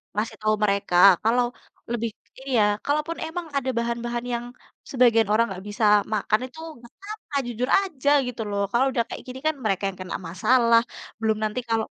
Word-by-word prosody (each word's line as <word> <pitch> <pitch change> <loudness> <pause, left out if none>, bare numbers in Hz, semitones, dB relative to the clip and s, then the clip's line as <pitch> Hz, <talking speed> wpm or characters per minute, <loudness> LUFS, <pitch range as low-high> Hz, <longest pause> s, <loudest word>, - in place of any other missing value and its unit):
ngasih 210 +2 -2
tahu 215 0 +2
mereka, 200 -3 0 0.3
kalau 240 +3 +3 0.5
lebih 230 -1 -1 0.4
iya, 235 -5 +3 0.2
kalaupun 305 +3 -1
emang 335 +1 -5
ada 265 -1 -1
bahan-bahan 235 +1 -3
yang 240 0 -3 0.5
sebagian 235 -4 +4
orang 225 +2 +4
gak 185 - -9
bisa 205 +2 -4 0.3
makan 215 0 +1
itu, 260 +5 -15 0.2
gak 235 - -14
apa-apa 405 -6 -9
jujur 245 +1 -3
aja 305 -9 -2 0.2
gitu 245 -2 -5
loh. 200 0 -1
Kalau 240 +4 +3
udah 235 -2 +1
kayak - - -7
gini 255 +1 -7
kan, 315 - +1
mereka 195 -2 0
yang 190 - -10
kena 185 - -5
masalah. 230 +5 +4 0.4
Belum 220 -1 +1
nanti 215 +3 -1
kalau 225 -1 +1
235 Hz, 175 wpm, -24 LUFS, 215-260 Hz, 0.5 s, sebagian